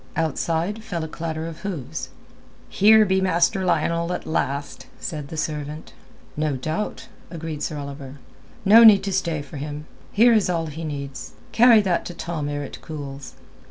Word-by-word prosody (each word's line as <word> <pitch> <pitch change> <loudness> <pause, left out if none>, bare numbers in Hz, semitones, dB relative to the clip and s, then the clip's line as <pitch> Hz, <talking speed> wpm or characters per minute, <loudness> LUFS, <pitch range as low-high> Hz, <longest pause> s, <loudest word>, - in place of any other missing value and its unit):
Outside 165 +6 -1
fell 175 -8 -4
a - - -4
clatter 160 0 -4
of 165 -1 -7
hooves. 180 -10 -5 0.6
"Here 215 +2 +6
be 190 -1 +2
Master 185 +1 +2
Lionel 170 0 +1
at - - -5
last," 140 -3 -3
said 150 -5 -5
the 160 - -8
servant. 150 0 -4 0.4
"No 150 -2 0
doubt," 155 +10 -4 0.2
agreed 160 -3 -6
Sir 150 - -3
Oliver. 140 -1 -7 0.5
"No 220 +4 +8
need 215 -3 +8
to 195 -1 -2
stay 170 -5 -1
for 145 - -10
him. 150 +1 -6 0.3
Here 235 +3 +5
is 215 -4 +3
all 165 -2 0
he 160 +1 -7
needs. 140 -3 -6 0.2
Carry 230 -1 +7
that 185 -4 0
to 175 - -7
Tom 160 -4 -4
ere 145 0 -3
it - - -9
cools." 140 -3 -8
160 Hz, 165 wpm, -23 LUFS, 145-185 Hz, 0.6 s, No